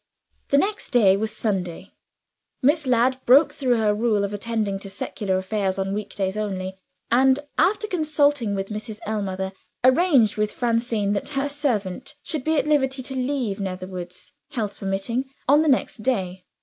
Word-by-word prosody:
The 280 - +4
next 405 +8 0
day 210 -7 +5
was 215 +2 -1
Sunday. 190 -6 -3 0.7
Miss 295 +1 +3
Ladd 255 +1 +2
broke 275 +6 +6
through 255 -3 +1
her 215 -2 +2
rule 210 -1 +1
of 200 0 -2
attending 210 -2 -2
to 195 - -7
secular 200 -4 -2
affairs 190 0 -1
on 195 0 -1
week 210 0 -5
days 190 -1 -1
only; 190 -3 -3 0.3
and, 260 +2 +5 0.2
after 405 +7 +3
consulting 290 - +1
with 195 0 -3
Mrs. 215 0 -6
Ellmother, 190 -3 -2 0.3
arranged 260 - +4
with 210 0 0
Francine 230 -4 0
that 200 - -2
her 275 -1 -1
servant 260 -3 -2
should 305 -5 -3
be 315 +1 +1
at - - +2
liberty 270 -3 +1
to 265 +1 -4
leave 255 -6 -1
Netherwoods 185 -1 -6 0.2
(health 210 -4 -3
permitting) 200 +7 -2 0.2
on 290 +3 +6
the 315 - +1
next 260 - +1
day. 190 -6 -2
220 Hz, 160 wpm, -23 LUFS, 195-265 Hz, 0.7 s, broke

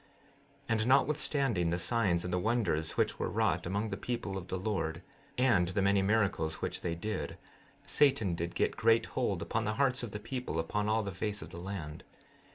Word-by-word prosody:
16:23 - - -28
And 110 0 +1
notwithstanding 135 - +2
the 85 - 0
signs 90 -3 +1
and 90 0 -3
the 90 - +2
wonders 95 -8 0
which - - +1
were - - -1
wrought - - +1
among 100 +4 -1
the 95 - -2
people 115 -2 -3
of 95 -2 -5
the 95 - -2
Lord, 90 -4 -2 0.3
and 120 -9 +4
the 95 +3 0
many 100 0 +4
miracles 95 -6 +1
which - - -3
they 85 -2 -2
did, 105 +3 -4 0.5
Satan 135 -10 +3
did 85 +1 -3
get - - +1
great 115 0 +4
hold - - 0
upon 115 0 -1
the 110 +1 -1
hearts 135 0 +2
of 120 - -4
the 105 - -6
people 125 -4 -4
upon 105 +6 -1
all 110 +1 +2
the 100 - -4
face 105 +3 -3
of - - -11
the 85 - -8
land. 85 -5 -6
100 Hz, 200 wpm, -32 LUFS, 90-115 Hz, 0.5 s, and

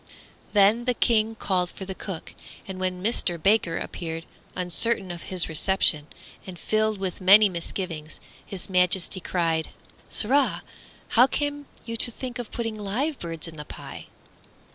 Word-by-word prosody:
Then 210 +3 +4
the 250 -1 +1
King 225 -1 +2
called 185 -4 -1
for 190 - -9
the 190 - -4
cook, 185 -3 -7 0.3
and 190 -1 -6
when 185 -1 -2
Mister 200 -5 +1
Baker 195 -1 +2
appeared, 165 -1 -5 0.3
uncertain 185 +2 +1
of 170 -1 -7
his 185 -2 +1
reception, 160 -2 +2 0.4
and 185 -2 -8
filled 215 +3 0
with 190 -2 -4
many 200 +3 +7
misgivings, 170 -3 -5 0.2
His 190 -3 -5
Majesty 180 0 +1
cried, 165 -3 -1 0.4
"Sirrah! 270 +5 +3 0.5
how 245 +3 +6
came 290 0 -2 0.2
you 230 -1 -5
to 240 - +7
think 245 +1 -7
of 240 - -5
putting 225 -2 -4
live 245 +9 -2
birds 165 -1 -5
in 160 -1 -11
the 150 - -7
pie?" - - -10
190 Hz, 150 wpm, -25 LUFS, 175-225 Hz, 0.5 s, many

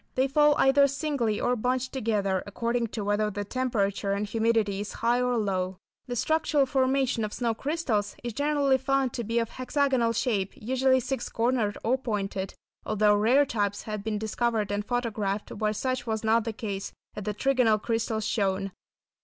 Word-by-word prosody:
They 260 +1 +3
fall 295 +1 +4
either 280 +1 +5
singly 275 -6 -1
or 250 - +1
bunched 255 +2 -1
together, 205 -7 0
according 235 +3 -1
to 215 -1 -5
whether 205 +1 +1
the 205 0 -4
temperature 200 -5 -1
and 200 +1 -1
humidity 220 -2 +1
is 210 - -6
high 240 +1 +3
or 250 -1 +1
low. 190 -3 -1 0.3
The 245 - -3
structural 310 +1 +2
formation 265 -3 +1
of 210 - -3
snow 235 -2 0
crystals 230 -6 -1
is 240 -1 -4
generally 285 -1 +2
found 270 -1 +1
to 240 - -3
be 230 +2 -2
of 230 -1 +1
hexagonal 255 -3 +1
shape, 210 -5 0
usually 260 +3 +2
six 265 +2 -3
cornered 230 -3 0
or 255 +4 +1
pointed, 195 -5 -3 0.3
although 210 0 +3
rare 235 +8 +4
types 205 -5 -1
have 215 -2 -5
been 215 -1 -1
discovered 220 0 -1
and 205 0 -1
photographed 215 -4 -2
where 210 0 -1
such 255 +4 -2
was 220 -1 -2
not 220 0 +3
the 225 - -1
case, 200 -3 -5 0.2
as 210 - -5
the 210 - -1
trigonal 250 -3 +3
crystals 225 -1 -1
shown. 195 -2 0
230 Hz, 175 wpm, -27 LUFS, 210-260 Hz, 0.3 s, either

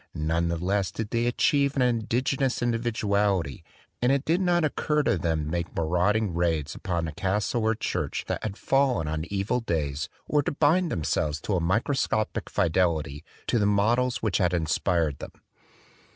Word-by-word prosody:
None 80 +2 0
the 85 0 -1
less 95 +2 0
did 110 -1 -5
they 115 0 +1
achieve 140 +3 +2
an 130 - +2
indigenous 125 +2 0
individuality; 105 - 0 0.4
and 125 +2 +3
it 140 0 +1
did 170 +4 +2
not 175 -3 +2
oc 150 - -2
cur 150 -1 +1
to - - +2
them 80 -3 -1
to 75 - -5
make 85 0 -3
marauding 90 +5 +1
raids 80 -4 0
upon 85 -3 -2
a - - -4
castle 100 +8 -1
or 110 +1 +2
church - - -2
that - - -3
had 105 -2 -4
fallen 135 - +1
on 80 +1 -2
evil 100 +6 -1
days 75 - -2 0.2
or 150 - +2
to 155 +3 -2
bind 160 +4 +2
themselves 75 -2 -1
to 100 - -1
a - - +2
microscopic 110 - 0
fidelity 80 -5 0 0.2
to 120 - +1
the 105 - +2
models 115 +5 +1
which 110 - +1
had 90 -2 +2
inspired 80 -2 0
them. - - -8
100 Hz, 175 wpm, -26 LUFS, 85-125 Hz, 0.4 s, and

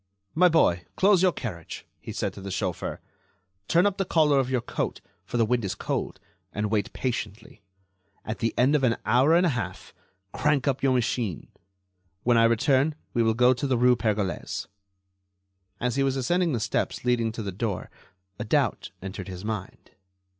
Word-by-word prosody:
"My 180 +2 +5
boy, 90 - +3
close 195 -2 +4
your 185 -1 +4
carriage," 100 - -7
he - - -8
said - - -2
to 100 - -10
the 100 - -6
chauffeur; 95 -1 -3 0.7
"turn 170 +3 +4
up 200 -2 +1
the - - +3
collar 155 -6 +3
of 130 -1 0
your 130 -1 +1
coat, - - -3 0.3
for - - -3
the 115 - +4
wind 120 +1 0
is 95 - -2
cold, - - -3 0.3
and 105 0 -2
wait 105 -3 0
patiently. 110 -5 -5 0.6
At 110 - -4
the 115 - 0
end 130 +4 +4
of 150 -3 +2
an 115 -3 +2
hour 130 +8 +4
and 175 +2 +4
a - - +3
half, 125 -7 -5 0.4
crank 145 -1 +1
up 135 -1 0
your 135 -1 +3
machine. 115 - -1 0.7
When 120 0 +3
I 115 0 +5
return 130 +6 +2 0.2
we 120 - +2
will 110 -1 +2
go 125 +2 +5
to 130 +3 -3
the 130 -2 +1
rue 125 +1 +5
Pergolese." 105 -5 -2 1.1
As 125 +1 -1
he - - +2
was 135 -1 +1
ascending 175 +5 +1
the 120 - 0
steps 110 +3 -2
leading 120 -2 +2
to 110 - -5
the 100 - -3
door 100 0 -3 0.5
a - - -2
doubt - - 0
entered 95 0 -6
his 95 +1 -7
mind. 105 -3 -6
120 Hz, 185 wpm, -26 LUFS, 110-140 Hz, 1.1 s, My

